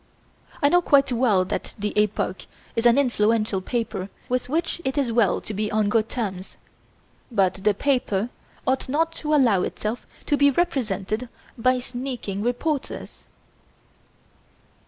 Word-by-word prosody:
I 285 - +6
know 355 +3 +5
quite 280 -5 +4
well 230 -7 +3
that - - -4
the 210 0 -2
'Epoque' 210 -3 0 0.3
is 230 +1 +3
an 235 - +5
influential 220 -6 +2
paper 205 -3 -3 0.2
with 250 0 -1
which 330 +3 -1
it 265 +2 -2
is 270 -5 +1
well 225 -4 +3
to 215 - -6
be 210 +1 -2
on 215 -1 +2
good 220 0 +1
terms, 195 -6 -4 0.7
but 195 -3 +1
the 210 -1 +3
paper 240 -5 0 0.4
ought 260 0 0
not 325 +4 +1
to 305 0 +1
allow 235 -10 +4
itself 215 +6 -3 0.2
to 290 - +2
be 285 0 +5
represented 235 - -1 0.3
by 255 +2 +2
sneaking 245 -5 -4
reporters. 255 +5 -3
235 Hz, 140 wpm, -24 LUFS, 210-265 Hz, 0.7 s, I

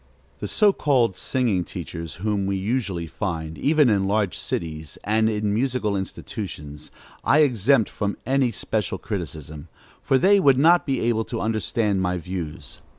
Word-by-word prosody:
The - - -4
so 210 -2 +4
called 125 - +2
singing 115 -8 0
teachers 85 -1 -7
whom 100 +1 -1
we 100 - 0
usually 100 -4 -2
find, 80 -3 -4
even 150 -1 +4
in 100 -4 +2
large 100 -2 0
cities 80 -2 -4
and 110 +2 +2
in 105 -1 -1
musical 120 -3 0
institutions, 80 -6 -6 0.3
I 155 - +4
exempt 125 -3 +3
from 100 -1 -3
any 135 -1 +2
special 105 -4 -2
criticism, 80 -6 -6 0.3
for 135 -1 +2
they 200 +8 +5
would 135 -7 +5
not 170 +5 +5
be 135 -2 0
able 115 -1 +1
to - - -4
understand 105 -1 0
my 90 0 0
views. 85 -3 -6
105 Hz, 150 wpm, -24 LUFS, 90-125 Hz, 0.3 s, they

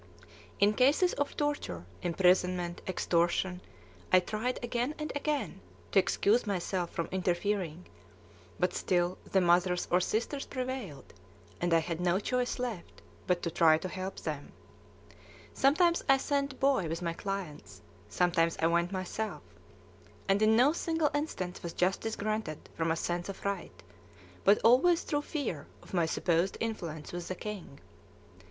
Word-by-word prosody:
In 205 +1 +5
cases 285 - +3
of 285 - -2
torture, 290 - -2 0.2
imprisonment, 180 0 +2
extortion, 180 0 +1 0.5
I 185 - +8
tried 215 +7 -2
again 240 +4 -1
and 305 0 -4
again 295 0 -2 0.3
to 195 - +6
excuse 205 +4 +2
myself 185 -2 -1
from 170 - -3
interfering, 180 -2 -1 0.7
but - - +1
still 175 0 0
the 195 - +4
mothers 180 0 +3
or 180 - +5
sisters 235 +9 -2
prevailed, 255 - -5 0.5
and 175 0 +1
I 165 - +6
had 165 +1 -2
no 180 +1 +2
choice 250 +3 -1
left 240 -8 -5 0.2
but 180 -1 +1
to 170 - -1
try 160 -1 +5
to 175 - -5
help 185 +1 -5
them. 150 -3 -5 1.0
Sometimes 335 +5 +3
I 270 - +7
sent 280 -1 -1
Boy 270 -10 +2
with 165 +2 -4
my 170 -1 -1
clients, 195 - -6 0.3
sometimes 170 - +2
I 160 - +2
went 170 +2 +2
myself; 195 +3 -4 0.8
and 195 +1 +3
in 215 +1 +5
no 260 +6 +5
single 325 -3 0
instance 240 - -3
was 170 - -5
justice 195 +5 0
granted 215 -7 -3
from 165 0 0
a 160 - +2
sense 175 +2 -2
of 195 - -8
right, 200 -2 -4 0.6
but 200 +2 +7
always 290 +9 +5
through 290 -1 -1
fear 245 - -4 0.2
of - - -15
my 170 -3 +2
supposed 170 +2 +1
influence 170 -9 -4
with 175 -1 -5
the 185 - -3
king. 195 -10 -7
190 Hz, 145 wpm, -31 LUFS, 175-245 Hz, 1.0 s, I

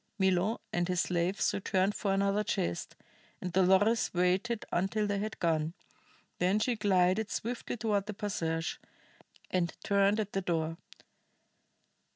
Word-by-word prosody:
Milo 190 +2 +2
and 175 0 +1
his 180 -1 +1
slaves 180 +2 0
returned 195 0 +1
for 200 - -1
another 200 +1 +2
chest, 85 - -2 0.4
and 180 -1 -5
Dolores 190 +5 +4
waited 190 +6 +1
until 195 +4 0
they 205 -1 -1
had 215 +2 -4
gone; 160 0 0 0.6
then 185 +3 +3
she 235 +3 +1
glided 200 0 +2
swiftly 240 +3 -3
toward 210 -2 0
the 210 - -3
passage, 165 -6 -2 0.7
and 175 -2 0
turned 200 +1 +3
at 205 -1 -3
the 195 - 0
door. 165 -2 -1
195 Hz, 135 wpm, -31 LUFS, 180-210 Hz, 0.7 s, Dolores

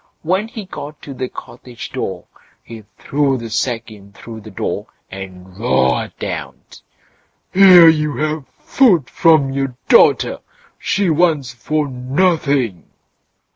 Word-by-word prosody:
When 190 +6 0
he 220 -3 -8
got 150 -5 -9
to 140 - -8
the 130 -1 -4
cottage 120 -3 -10
door - - -5 0.4
he 110 -2 -11
threw 140 -2 0
the 115 -2 -8
sack 115 0 -2
in 100 -2 -15
through 110 +2 -10
the 110 - -11
door, 95 - -4 0.2
and 95 -1 -10
roared 65 - 0
out: - - -7 0.7
"Here 185 -3 +8
you 150 -2 +2
have 155 -2 -2
food 185 - +2
from 155 -6 +3
your 135 -2 -3
daughter; 475 - +4 0.4
she 195 -4 0
wants 155 -6 +1
for 150 +4 -2
nothing." 135 - 0
135 Hz, 130 wpm, -17 LUFS, 115-160 Hz, 0.7 s, Here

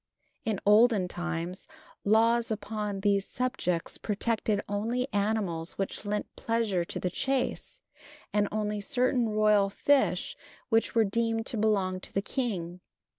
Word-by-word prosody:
In 215 -3 0
olden 210 -2 +5
times 175 +1 -4 0.4
laws 230 +3 +3
upon 210 -2 -3
these 200 -1 +2
subjects 245 -9 -2
protected 215 0 0
only 230 +5 -1
animals 200 -5 0
which 195 +2 -4
lent 210 0 -3
pleasure 225 -6 0
to - - -5
the 180 - -2
chase, 270 - -2 0.5
and 205 0 +2
also 210 -1 -1
certain 245 +1 +1
royal 210 -2 +3
fish 280 +7 +2 0.3
which 225 0 +2
were 225 -1 +5
deemed 225 +2 0
to 235 - -3
belong 200 -4 +1
to - - -5
the 195 - 0
king. 185 -9 -3
210 Hz, 130 wpm, -29 LUFS, 195-230 Hz, 0.5 s, olden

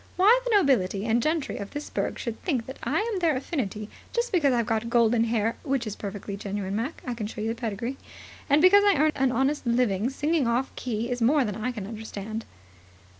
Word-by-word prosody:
Why 425 +7 +6
the - - +1
nobility 225 - +2
and 230 +1 +2
gentry 310 +1 -1
of 200 0 -6
this 290 +1 -7
burg - - -2
should 235 -3 -5
think 265 -11 -1
that 265 - -9
I'm 430 -2 -1
their 330 -5 +2
affinity 225 - -3 0.3
just 475 0 0
because 310 -7 +3
I've 235 -2 +1
got 225 +1 -1
golden 235 -1 +3
hair 225 0 0
which 270 -4 -1
is 210 -2 -4
perfectly 200 0 -6
genuine, 200 -1 -4
Mac; 240 +9 -3
I 250 - -2
can 225 -3 -4
show 220 - -8
you 220 +1 -1
the 230 +2 -5
pedigree 230 +4 -3 0.5
and 290 +3 +4
because 400 +2 +7
I 405 -2 +5
earn 310 +2 +4
an 270 -2 +1
honest 270 +4 +1
living 235 -2 +2
singing 290 0 0
off 245 +3 +1
the - - -9
key, 235 0 -2
is 245 0 -2
more 270 +3 +4
than 210 -3 -3
I 220 +4 -2
can 215 -5 -6
understand." 220 0 -6
240 Hz, 220 wpm, -26 LUFS, 220-290 Hz, 0.5 s, because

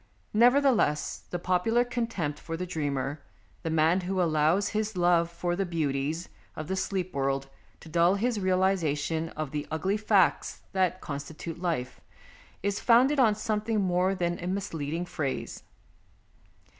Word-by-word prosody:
Neverthe 255 +4 +5
less, 150 -8 0
the 175 - -2
popular 185 +8 +2
contempt 230 -12 -2
for 165 -1 -5
the 180 - -3
dreamer, 145 -4 -2 0.4
the 165 - -3
man 160 +3 +3
who 185 +1 -2
allows 165 +3 +2
his 215 -2 -2
love 175 -1 +3
for 175 +1 -2
the 195 - 0
beauties 155 -1 -2 0.3
of 155 - -6
the 190 - -1
sleep 190 -1 -2
world 135 0 -1 0.3
to - - -12
dull 170 +4 +3
his 230 +2 0
realization 170 -4 +1
of 155 -3 -3
the 150 -1 -3
ugly 190 +6 0
facts 210 - +2
that 185 -1 0
constitute 155 +3 -6
life, 160 -9 -2 0.6
is 200 0 0
founded 255 +5 +4
on 220 -5 +5
something 215 +1 -1
more 185 0 +1
than 175 -1 -1
a - - -3
misleading 170 -4 -3
phrase. 145 -6 -4
175 Hz, 145 wpm, -28 LUFS, 155-200 Hz, 0.6 s, Neverthe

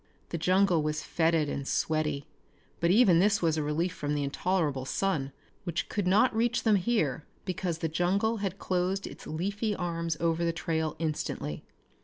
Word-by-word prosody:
The 170 - -3
jungle 185 0 +3
was 155 +1 -2
fetid 160 -2 +2
and 140 -1 -4
sweaty, 150 -3 0 0.5
but 170 - +2
even 190 -4 +6
this 205 +2 +4
was 165 -2 +2
a 155 - 0
relief 160 +4 -1
from 145 -3 -2
the 145 - 0
intolerable 145 -1 0
sun 140 -2 -1 0.3
which 175 -3 -3
could 205 -4 -1
not 215 +6 +4
reach 240 +1 +1
them 215 -3 +4
here 175 - 0 0.2
because 180 -3 -2
the 165 - -1
jungle 190 +8 +1
had 195 -2 -3
closed 185 +1 -1
its - - -9
leafy 200 +6 -2
arms 170 -3 -2
over 165 0 +1
the 170 - +2
trail 160 -2 -1
instantly. 150 - -3
170 Hz, 170 wpm, -29 LUFS, 155-195 Hz, 0.5 s, even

